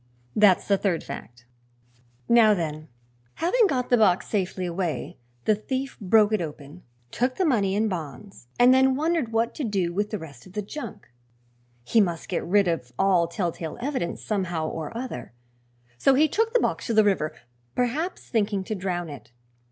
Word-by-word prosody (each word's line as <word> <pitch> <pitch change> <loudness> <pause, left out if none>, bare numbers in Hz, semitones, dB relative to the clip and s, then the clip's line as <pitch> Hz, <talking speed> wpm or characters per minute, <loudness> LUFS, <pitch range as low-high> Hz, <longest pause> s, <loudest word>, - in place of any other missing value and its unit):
That's 205 -3 +5
the 200 -1 +3
third 180 -5 0
fact. 120 -3 -9 0.8
"Now, 225 -3 +6
then, 155 -3 -4 0.5
having 430 +6 +3
got 255 -7 -2
the 245 - +6
box 190 -4 +3
safely 190 -2 -2
away, 170 -5 -3 0.3
the - - +4
thief 260 +6 -3
broke 215 +1 +4
it 215 - +1
open, 150 +1 -8 0.3
took 255 +1 0
the 375 - +1
money 205 - +2
and 220 +2 +2
bonds, 180 - -7
and 245 +1 +7
then 265 0 +4
wondered 310 -4 0
what 225 +1 +1
to 300 - -4
do 195 -7 -1
with 205 +3 -1
the 215 - -3
rest 145 -7 -11
of 185 - -16
the 210 0 -3
junk. 235 +1 -8 0.8
He 220 - +3
must 170 -4 -2
get 180 - -1
rid 200 +2 +3
of 160 -8 -2
all 185 -2 +3
telltale 170 -2 -4
evidence, 255 -8 -3
somehow 175 -6 -1
or 160 -2 -5
other, 230 - -6 0.7
so 270 - +4
he 305 +4 +5
took 450 +8 0
the - - +6
box - - -1
to 230 - 0
the 215 - +6
river, 185 -7 +1 0.4
perhaps 290 +9 -2
thinking 205 -4 0
to 215 - -4
drown 180 -3 -3
it. 145 -3 -10
200 Hz, 175 wpm, -25 LUFS, 170-240 Hz, 0.8 s, and